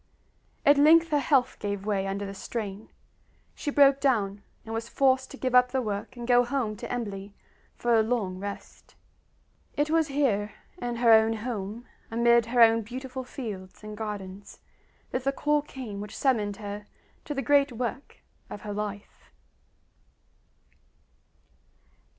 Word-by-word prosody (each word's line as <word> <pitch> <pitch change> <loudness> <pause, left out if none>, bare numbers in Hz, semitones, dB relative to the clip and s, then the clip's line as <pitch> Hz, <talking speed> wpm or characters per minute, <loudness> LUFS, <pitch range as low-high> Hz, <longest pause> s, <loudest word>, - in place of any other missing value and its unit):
At 285 0 +6
length 330 +3 +6
her 295 -2 +2
health 270 -2 +2
gave 200 -1 -3
way 195 -2 0
under 200 +1 -3
the 195 - -6
strain; 205 0 -6 0.6
she 295 - -4
broke 280 -1 +5
down, 210 -8 +1 0.2
and 225 - -6
was 225 +1 -4
forced 265 -1 +2
to 275 - -10
give 255 -2 -2
up 250 0 +6
the 260 +1 0
work 210 0 -4
and 240 0 -6
go 245 -1 +5
home 240 -4 -2
to - - -7
Embley 205 -4 -5 0.4
for 240 0 0
a 225 - +6
long 215 -5 -1
rest. 200 +1 -8 0.8
It 295 +1 +1
was 325 -1 +3
here, 235 -8 0 0.3
in 240 -1 -3
her 235 -1 +4
own 220 0 +6
home, 220 0 -5 0.2
amid 235 0 +3
her 240 0 +2
own 230 0 +6
beautiful 255 +3 -6
fields 210 -8 -8
and 215 0 -7
gardens, 205 -2 -7 0.5
that 255 - -2
the 275 - +2
call 295 +1 +1
came 250 -8 -7
which 210 0 -8
summoned 210 -7 +1
her 205 0 -7 0.4
to 295 - -4
the 275 - -2
great 280 +2 +4
work 245 +3 -5 0.3
of 205 - -8
her 210 -1 -5
life. 205 0 -6
230 Hz, 155 wpm, -27 LUFS, 205-265 Hz, 0.8 s, At